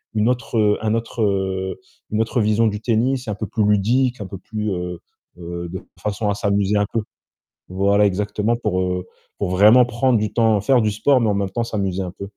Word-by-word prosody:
une 105 +2 +2
autre, 125 -1 -2
heu, 105 -1 +3
un 110 0 0
autre, 115 0 -4
heu, 95 -1 -1 0.3
une 105 - 0
autre 115 +2 0
vision 110 +2 +2
du 105 0 -3
tennis 125 +2 0
un 105 - -2
peu 105 - -4
plus 110 +1 -1
ludique, 120 +5 +2
un 95 - -5
peu 95 - -8
plus, 105 0 -4
heu 90 -1 -4 0.4
heu, 85 0 -6
de 95 +2 -6 0.2
façon 105 0 -2
à - - +1
s'amuser 100 0 0
un 100 - +2
peu. 115 - +1 0.7
Voilà, 100 +2 +2
exactement 105 +4 0
pour, 105 -6 -1
heu, 90 0 -2 0.3
pour - - -2
vraiment 105 +7 +6
prendre 120 0 +1
du 105 -1 -2
temps, 110 -3 +3
faire 125 +2 +3
du 105 - +1
sport, 130 +5 +3
mais 110 - +1
en 100 - +1
même 100 -1 -1
temps 115 +5 -2
s'amuser 95 -4 -2
un 90 -1 -5
peu. 100 - -6
105 Hz, 220 wpm, -21 LUFS, 95-115 Hz, 0.7 s, vraiment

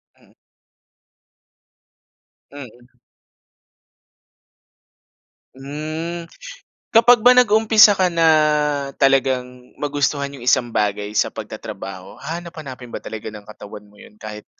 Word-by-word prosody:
Hmm. - - -27 2.2
Mm. 125 -4 -12 2.7
Hmm, 155 +5 -6 0.7
kapag 235 0 +5
ba 250 - +8
nag-umpisa 220 -3 +5
ka 185 - +2
na 165 -1 +3 0.7
talagang 130 -2 0
magustuhan 145 -1 -1
'yong 135 -4 -11
isang 125 -1 +2
bagay 105 -2 -2
sa - - +1
pagtatrabaho 95 0 -9
hahanap-hanapin 155 -7 -8
ba - - -6
talaga 110 0 -8
ng 105 - -10
katawan 105 -1 -11
mo 105 - -23
'yon - - -16
kahit 105 -1 -9
140 Hz, 95 wpm, -20 LUFS, 120-170 Hz, 2.7 s, ba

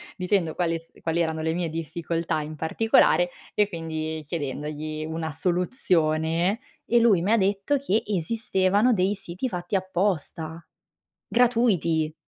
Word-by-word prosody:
dicendo 180 -3 0
quale 165 -2 0
s 165 - -20
quali 165 0 -1
erano 160 -1 0
le 160 0 0
mie 175 0 -1
difficoltà 165 +1 -2
in 155 +1 -6
particolare, 175 +2 +3 0.2
e 210 -1 +3
quindi 160 -3 -4
chiedendogli 150 +1 -4
una 160 0 -3
soluzione. 170 - +1 0.3
E 240 - +4
lui 215 -7 +5
mi 195 +5 0
ha - - +5
detto 200 +7 +1
che 225 -6 +1
esistevano 205 +3 +1
dei 190 -1 +2
siti 190 +5 -4
fatti 180 0 -3
apposta, 175 -3 -2 0.6
gratuiti. 205 -11 +2
170 Hz, 130 wpm, -25 LUFS, 160-200 Hz, 0.6 s, lui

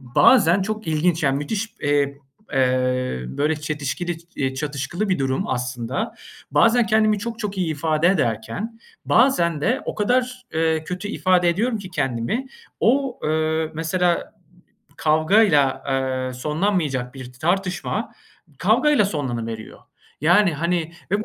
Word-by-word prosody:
bazen 170 - +4
çok 215 0 -4
ilginç, 160 +2 +1
yani, 135 -2 +2
müthiş, 205 +10 -3
eee, 140 -1 +1 0.3
eee, 130 - +1
böyle, 150 - 0
çetişkili, 150 +3 -3 0.2
iii, 135 -1 -1
çatışkılı 150 +8 -3
bir 185 - +1
durum 135 0 -1
aslında. 125 - -3 0.4
Bazen 230 0 +4
kendimi 215 -1 +3
çok 230 +2 -5
çok 205 -3 -4
iyi 175 -3 0
ifade 155 +2 +1
ederken 190 - -1 0.2
bazen 170 - +3
de 240 - +1
o - - -4
kadar, 250 +3 0
eee, 160 0 +1
kötü 180 +4 -5
ifade 185 -4 +2
ediyorum 225 +7 0
ki 190 -2 -9
kendimi, 145 - -2 0.3
o, 265 +1 +1
eee, 160 +1 0
mesela 170 +2 0 0.6
kavgayla, 155 -4 +3
eee, 130 -1 -1
sonlanmayacak 150 -3 -1
bir 130 -2 -9
tartışma 180 +7 -2 0.5
kavgayla 300 -7 +3
sonlanıveriyor. 120 - -4 0.4
Yani, 175 +3 +4
hani, 170 +1 -1 0.2
ve 205 +2 0
160 Hz, 125 wpm, -22 LUFS, 135-200 Hz, 0.6 s, bazen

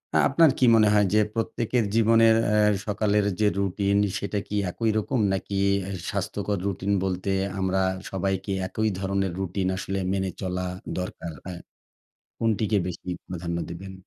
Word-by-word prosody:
না - - +5
আপনার 160 +2 +5
কী 130 - +5
মনে 110 -1 +5
হয়? 105 -1 +4
যে 110 - +5
প্রত্যেকের 115 +1 0
জীবনের 115 0 +5
অ্যা 105 0 +3 0.3
সকালের 105 0 +1
যে 105 - +4
রুটিন 100 +1 +1 0.2
সেটা 100 0 -2
কি 105 - -4 0.2
একই 115 +3 -1
রকম? 120 +4 0
নাকি 95 +1 -4 0.4
এ - - -4 0.2
স্বাস্থ্যকর 105 -1 -2
রুটিন 100 0 -1
বলতে 95 0 -2 0.3
আমরা 95 0 +1 0.3
সবাইকে 95 +1 -2 0.2
একই 110 +3 0
ধরনের 95 -1 -1
রুটিন 95 0 -2
আসলে 95 +1 -3
মেনে 95 -1 -1
চলা 90 -1 -2 0.3
দরকার 90 -2 -5
হ্যাঁ 90 -1 -6 0.8
কোনটিকে 110 -1 +1
বেশি 90 0 -6 0.2
প্রাধান্য 85 -1 -4
দেবেন? 95 +3 -7
100 Hz, 150 wpm, -25 LUFS, 95-110 Hz, 0.8 s, না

